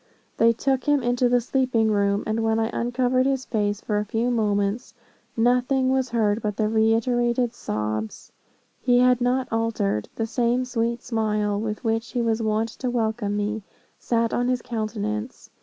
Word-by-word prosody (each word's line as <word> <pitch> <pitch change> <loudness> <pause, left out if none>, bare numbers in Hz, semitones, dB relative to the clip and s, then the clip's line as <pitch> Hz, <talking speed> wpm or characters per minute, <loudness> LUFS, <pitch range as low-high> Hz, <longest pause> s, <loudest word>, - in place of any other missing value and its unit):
They 230 +1 +5
took 265 +3 -1
him 290 -3 +2
into 245 +1 +2
the 245 0 +4
sleeping 240 -3 +1
room, 200 -1 +1
and 220 +1 -1
when 225 0 +1
I 225 0 0
uncovered 250 +2 +1
his 265 -1 -1
face, 205 -2 -1
for 210 -1 -1
a - - -1
few 230 +4 -1
moments, 210 0 -1 0.4
nothing 250 +3 +2
was 265 -1 +1
heard 220 -2 +1
but 210 -1 -3
reiterated 230 +2 +2
sobs. 110 - -4 0.5
He 245 -1 +3
had 250 0 +4
not 250 +1 +1
altered 225 - -1
the 225 - -1
same 240 +2 0
sweet 235 -1 -2
smile, 210 -3 -1
with 215 +1 -4
which 225 0 -1
he 245 - 0
was 225 0 0
wont 220 +1 0
to 255 - -1
welcome 220 -3 -1
me, 210 +1 -2 0.4
sat 230 -1 0
on 245 - +1
his 250 -1 0
countenance. 105 - -4
230 Hz, 165 wpm, -24 LUFS, 215-245 Hz, 0.5 s, They